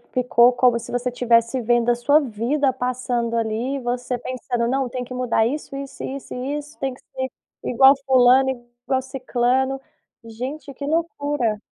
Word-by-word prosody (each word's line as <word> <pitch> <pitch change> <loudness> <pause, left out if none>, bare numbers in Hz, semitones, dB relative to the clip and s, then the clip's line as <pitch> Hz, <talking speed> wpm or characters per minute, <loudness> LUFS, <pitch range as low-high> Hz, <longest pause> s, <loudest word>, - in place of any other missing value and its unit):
Ficou 250 -1 +4
como 245 -1 +3
se 230 - -9
você 245 +1 -1
tivesse 235 +1 +2
vendo 240 +1 +2
a - - +4
sua 285 +6 +3
vida 265 +3 0
passando 250 -2 -2
ali 230 +4 -1
e - - -3
você 245 0 -2
pensando: 245 -1 -3
"Não, 265 0 0
tem 250 +1 -4
que 250 +1 -9
mudar 245 -3 +1
isso, 280 +1 -4
isso, 275 0 -7
isso 275 0 -6
e 265 +4 -3
isso. 295 +1 -11
Tem 270 -1 -2
que - - -19
ser 260 0 -5 0.4
igual 265 +3 +6
fulano, 260 0 +5 0.4
igual 260 -1 +1
ciclano". 260 0 0 0.4
Gente, 260 +6 -6
que 280 - -7
loucura. 290 -8 -1
255 Hz, 170 wpm, -22 LUFS, 240-270 Hz, 0.4 s, igual